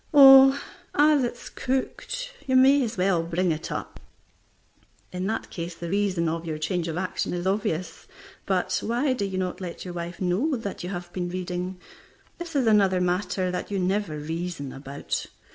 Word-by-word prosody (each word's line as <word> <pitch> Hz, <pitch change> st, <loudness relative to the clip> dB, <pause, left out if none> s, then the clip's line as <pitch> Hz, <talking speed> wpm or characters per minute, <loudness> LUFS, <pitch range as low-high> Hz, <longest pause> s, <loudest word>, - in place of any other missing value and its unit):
"Oh, 270 Hz, 0 st, +9 dB, 0.4 s
as 295 Hz, -1 st, +5 dB
it's 240 Hz, 0 st, -4 dB
cooked, -, -, -3 dB
you 260 Hz, -, +2 dB
may 270 Hz, +2 st, +6 dB
as 230 Hz, -2 st, -4 dB
well 180 Hz, -2 st, +2 dB
bring 170 Hz, +2 st, 0 dB
it 155 Hz, +1 st, -4 dB
up." -, -, -5 dB, 1.1 s
In 180 Hz, +1 st, -3 dB
that 220 Hz, +2 st, -3 dB
case 170 Hz, 0 st, -5 dB
the 170 Hz, 0 st, -6 dB
reason 195 Hz, -4 st, +1 dB
of 165 Hz, +1 st, -2 dB
your 160 Hz, -2 st, -4 dB
change 170 Hz, +2 st, -1 dB
of 165 Hz, 0 st, -3 dB
action 180 Hz, -1 st, -2 dB
is 175 Hz, +1 st, -3 dB
obvious. 185 Hz, -4 st, -2 dB, 0.4 s
But 185 Hz, -1 st, +1 dB
why 245 Hz, +4 st, +1 dB
do 215 Hz, -6 st, -2 dB
you 190 Hz, -1 st, -3 dB
not 185 Hz, 0 st, -3 dB
let 180 Hz, 0 st, -6 dB
your 180 Hz, -, -6 dB
wife 175 Hz, 0 st, -6 dB
know 195 Hz, -, +1 dB
that 205 Hz, -7 st, -5 dB
you 180 Hz, -, -4 dB
have 175 Hz, -2 st, -6 dB
been 175 Hz, -1 st, -2 dB
reading? 180 Hz, 0 st, -4 dB, 0.6 s
This 340 Hz, -2 st, -7 dB
is 270 Hz, -3 st, +2 dB
another 200 Hz, -4 st, +4 dB
matter 180 Hz, +1 st, 0 dB
that 180 Hz, -, -4 dB
you 200 Hz, -, -2 dB
never 185 Hz, -3 st, 0 dB
reason 160 Hz, -2 st, -4 dB
about. 140 Hz, +1 st, -4 dB
185 Hz, 180 wpm, -26 LUFS, 175-225 Hz, 1.1 s, Oh